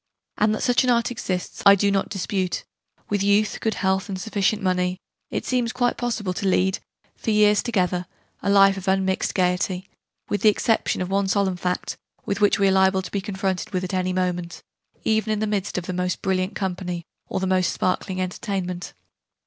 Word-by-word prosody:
And 215 Hz, 0 st, +3 dB
that -, -, -4 dB
such 245 Hz, +1 st, +3 dB
an 255 Hz, -, +1 dB
Art 235 Hz, 0 st, +2 dB
exists 185 Hz, -6 st, -4 dB
I 200 Hz, 0 st, +8 dB
do 200 Hz, +1 st, +2 dB
not 195 Hz, 0 st, 0 dB
dispute: 190 Hz, -1 st, -2 dB, 0.4 s
with 205 Hz, -1 st, 0 dB
youth, 205 Hz, +1 st, +2 dB
good 220 Hz, -, 0 dB
health, 190 Hz, +1 st, 0 dB
and 190 Hz, -1 st, -4 dB
sufficient 205 Hz, +1 st, 0 dB
money, 180 Hz, -1 st, +1 dB, 0.3 s
it -, -, -3 dB
seems 245 Hz, -2 st, 0 dB
quite 245 Hz, -1 st, +1 dB
possible 225 Hz, -6 st, -2 dB
to 195 Hz, -, -2 dB
lead, 190 Hz, +1 st, +2 dB, 0.4 s
for -, -, -4 dB
years 210 Hz, -1 st, +4 dB
together, 180 Hz, -6 st, 0 dB, 0.3 s
a -, -, -1 dB
life 195 Hz, -1 st, +6 dB
of 190 Hz, 0 st, -7 dB
unmixed 190 Hz, 0 st, +1 dB
gaiety 180 Hz, 0 st, 0 dB, 0.4 s
with 205 Hz, -, -1 dB
the 215 Hz, -, +7 dB
exception 220 Hz, -2 st, +1 dB
of 180 Hz, -, -6 dB
one 195 Hz, 0 st, +1 dB
solemn 190 Hz, -1 st, +1 dB
fact, 180 Hz, 0 st, -3 dB, 0.3 s
with 200 Hz, +1 st, -2 dB
which 205 Hz, -, +4 dB
we 200 Hz, -, +3 dB
are -, -, +4 dB
liable 190 Hz, 0 st, +3 dB
to 180 Hz, -, -8 dB
be 200 Hz, -, -1 dB
confronted 190 Hz, -1 st, -3 dB
at 185 Hz, -, -4 dB
any 185 Hz, 0 st, 0 dB
moment, 180 Hz, -1 st, -2 dB, 0.4 s
even 220 Hz, 0 st, +1 dB
in 215 Hz, -, +1 dB
the 215 Hz, -, 0 dB
midst 205 Hz, -3 st, -2 dB
of 180 Hz, -, -3 dB
the 185 Hz, -, -3 dB
most 180 Hz, 0 st, -2 dB
brilliant 185 Hz, 0 st, 0 dB
company 180 Hz, -3 st, -3 dB, 0.2 s
or -, -, -2 dB
the 190 Hz, -, -1 dB
most 185 Hz, -1 st, +2 dB
sparkling 185 Hz, +1 st, -1 dB
entertainment. 185 Hz, -1 st, -3 dB
190 Hz, 195 wpm, -23 LUFS, 185-210 Hz, 0.4 s, I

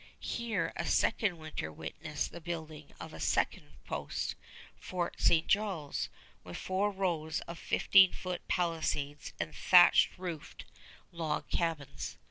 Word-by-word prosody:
Here 235 Hz, -1 st, -2 dB
a -, -, -3 dB
second 195 Hz, -7 st, +2 dB
winter 155 Hz, -, -5 dB
witnessed 150 Hz, -, -4 dB
the 170 Hz, -, -9 dB
building 160 Hz, -3 st, -6 dB
of -, -, -8 dB
a -, -, -9 dB
second 75 Hz, -, 0 dB
post, -, -, -3 dB, 0.4 s
Fort 180 Hz, -2 st, -3 dB
St. 165 Hz, -1 st, +4 dB
Charles, 195 Hz, -8 st, 0 dB, 0.3 s
with 90 Hz, -, -7 dB
four 190 Hz, +2 st, 0 dB
rows 175 Hz, -6 st, -1 dB
of 170 Hz, 0 st, -8 dB
fifteen 190 Hz, -2 st, +5 dB
foot 180 Hz, -1 st, -4 dB
palisades 160 Hz, -4 st, -1 dB
and 155 Hz, -, -3 dB
thatched 175 Hz, 0 st, +6 dB
roofed 175 Hz, -5 st, -6 dB, 0.5 s
log 165 Hz, -3 st, -2 dB
cabins. 145 Hz, -, -2 dB
165 Hz, 125 wpm, -32 LUFS, 150-185 Hz, 0.5 s, thatched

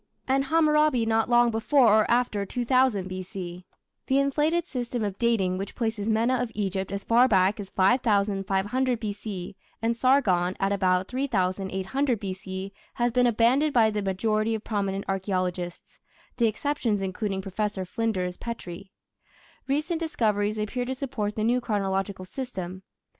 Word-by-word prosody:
and 270 Hz, +1 st, +2 dB
Hammurabi 300 Hz, -5 st, +3 dB
not 225 Hz, 0 st, +1 dB
long 240 Hz, 0 st, +5 dB
before 240 Hz, +4 st, +3 dB
or 215 Hz, -1 st, +3 dB
after 235 Hz, -4 st, +1 dB
2000 245 Hz, -2 st, +1 dB
B.C. 185 Hz, -1 st, -7 dB, 0.4 s
The 265 Hz, -, +2 dB
inflated 300 Hz, +5 st, +1 dB
system 245 Hz, -5 st, -3 dB
of 200 Hz, -2 st, -3 dB
dating 195 Hz, -6 st, +1 dB
which 195 Hz, 0 st, -6 dB
places 220 Hz, -3 st, -2 dB
Mena 230 Hz, +4 st, +2 dB
of 245 Hz, -2 st, -2 dB
Egypt 195 Hz, -2 st, -2 dB
as 200 Hz, 0 st, -4 dB
far 240 Hz, +2 st, +5 dB
back 190 Hz, -2 st, +3 dB
as 195 Hz, -2 st, -6 dB
5500 205 Hz, +3 st, +1 dB
B.C. 205 Hz, -4 st, -5 dB, 0.2 s
and 230 Hz, +1 st, 0 dB
Sargon 210 Hz, -9 st, +2 dB
at 195 Hz, 0 st, +1 dB
about 185 Hz, -1 st, +1 dB
3800 205 Hz, 0 st, -1 dB
B.C. 190 Hz, 0 st, -6 dB, 0.2 s
has 240 Hz, 0 st, +1 dB
been 250 Hz, +1 st, +3 dB
abandoned 245 Hz, +6 st, +3 dB
by 225 Hz, -3 st, +4 dB
the 210 Hz, 0 st, -2 dB
majority 215 Hz, +3 st, 0 dB
of 220 Hz, -, -6 dB
prominent 200 Hz, -2 st, -2 dB
archaeologists, 185 Hz, -2 st, -3 dB, 0.4 s
the 235 Hz, -, +3 dB
exceptions 225 Hz, -3 st, -1 dB
including 195 Hz, +1 st, -2 dB
Professor 195 Hz, 0 st, -3 dB
Flinders 185 Hz, -3 st, -2 dB
Petrie. 195 Hz, -5 st, -7 dB, 0.8 s
Recent 305 Hz, +5 st, 0 dB
discoveries 215 Hz, -10 st, 0 dB
appear 215 Hz, +4 st, -2 dB
to 260 Hz, +1 st, -3 dB
support 245 Hz, -6 st, -3 dB
the 215 Hz, -, -1 dB
new 245 Hz, +3 st, +2 dB
chronological 195 Hz, -3 st, -2 dB
system. 185 Hz, -5 st, -6 dB
215 Hz, 140 wpm, -26 LUFS, 195-245 Hz, 0.8 s, long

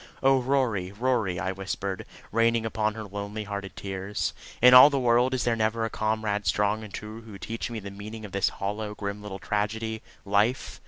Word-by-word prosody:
"Oh, 135 Hz, -1 st, +5 dB
Rory, 120 Hz, -8 st, 0 dB
Rory!" 110 Hz, -5 st, 0 dB
I 95 Hz, -, -1 dB
whispered, 95 Hz, 0 st, -4 dB, 0.2 s
raining 115 Hz, 0 st, +2 dB
upon 110 Hz, -1 st, 0 dB
her 110 Hz, -, -5 dB
lonely 100 Hz, +1 st, -5 dB
hearted 100 Hz, -4 st, -6 dB
tears. 95 Hz, +1 st, -3 dB, 0.3 s
"In 125 Hz, +1 st, +8 dB
all 125 Hz, +3 st, +11 dB
the 140 Hz, -, 0 dB
world 125 Hz, +1 st, +3 dB
is 125 Hz, -, -1 dB
there 120 Hz, -1 st, +2 dB
never 110 Hz, +1 st, 0 dB
a 115 Hz, -, -4 dB
comrade 110 Hz, -1 st, -1 dB
strong 105 Hz, +1 st, +1 dB
and 105 Hz, -, -9 dB
true 110 Hz, +3 st, -7 dB
to 110 Hz, -3 st, -10 dB
teach 115 Hz, +4 st, -4 dB
me 115 Hz, -2 st, -4 dB
the 100 Hz, -1 st, -8 dB
meaning 105 Hz, +2 st, -8 dB
of 100 Hz, -, -9 dB
this 100 Hz, 0 st, +2 dB
hollow, 105 Hz, +1 st, -4 dB
grim 100 Hz, 0 st, -4 dB
little 105 Hz, -2 st, -6 dB
tragedy 110 Hz, +2 st, -2 dB, 0.2 s
life? 105 Hz, +6 st, +1 dB
110 Hz, 195 wpm, -27 LUFS, 100-115 Hz, 0.3 s, all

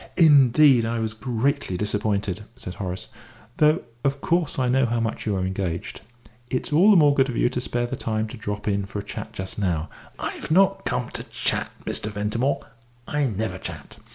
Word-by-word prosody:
"Indeed, 140 Hz, -5 st, +6 dB
I 115 Hz, +1 st, -1 dB
was 110 Hz, -1 st, -2 dB
greatly 120 Hz, -1 st, -1 dB
disappointed," 105 Hz, -1 st, -1 dB
said 90 Hz, -, -7 dB
Horace, 95 Hz, -1 st, -5 dB, 0.5 s
"though 155 Hz, +3 st, +4 dB, 0.2 s
of 140 Hz, 0 st, 0 dB
course 170 Hz, +1 st, 0 dB
I 130 Hz, -2 st, +1 dB
know 130 Hz, 0 st, +3 dB
how 120 Hz, 0 st, 0 dB
much 115 Hz, -1 st, -3 dB
you 105 Hz, -, +1 dB
are 95 Hz, -1 st, -1 dB
engaged. 95 Hz, -3 st, -3 dB, 0.5 s
It's 130 Hz, +3 st, -2 dB
all 180 Hz, +8 st, +6 dB
the 205 Hz, -, +7 dB
more 145 Hz, -3 st, +6 dB
good 135 Hz, -1 st, +2 dB
of 120 Hz, -, -3 dB
you -, -, +3 dB
to 125 Hz, 0 st, -3 dB
spare 120 Hz, -1 st, -1 dB
time 110 Hz, -2 st, -2 dB
to -, -, -8 dB
drop 105 Hz, -1 st, -5 dB
in 100 Hz, -1 st, 0 dB
for 100 Hz, -, -6 dB
a 100 Hz, -, -3 dB
chat 100 Hz, -, -7 dB
just 95 Hz, +2 st, -6 dB
now." 85 Hz, -5 st, -1 dB, 0.3 s
"I've -, -, -5 dB
not 190 Hz, +4 st, +3 dB
come 60 Hz, -, -1 dB
to -, -, -5 dB
chat, -, -, -1 dB, 0.2 s
Mr. -, -, 0 dB
Ventimore. 105 Hz, +6 st, -1 dB, 0.5 s
I 145 Hz, -1 st, +1 dB
never 110 Hz, -1 st, -3 dB
chat. -, -, -8 dB
115 Hz, 190 wpm, -24 LUFS, 100-140 Hz, 0.5 s, the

